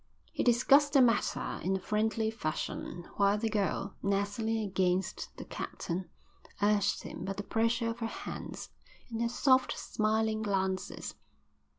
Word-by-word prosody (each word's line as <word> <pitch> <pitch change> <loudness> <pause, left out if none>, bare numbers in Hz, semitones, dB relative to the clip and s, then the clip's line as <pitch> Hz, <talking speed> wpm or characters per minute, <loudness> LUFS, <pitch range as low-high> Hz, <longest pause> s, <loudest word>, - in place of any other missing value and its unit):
They - - 0
discussed 275 +4 +5
the 275 - +7
matter 230 -3 +1
in 190 +2 +1
a - - -1
friendly 220 +2 0
fashion, 175 -2 -4
while 200 0 +4
the 220 +1 -1
girl, 200 -1 0
nestling 205 +3 0
against 190 -3 0
the - - -7
captain, 175 0 -4 0.5
urged 205 -1 +2
him - - -7
by 195 - -2
the 200 - -5
pressure 230 +2 +1
of 230 - -8
her 230 - -1
hands - - -7 0.4
and 225 0 -2
her 235 - +1
soft, 260 +1 +3
smiling 220 0 0
glances. 190 -3 -1
215 Hz, 145 wpm, -31 LUFS, 195-230 Hz, 0.5 s, the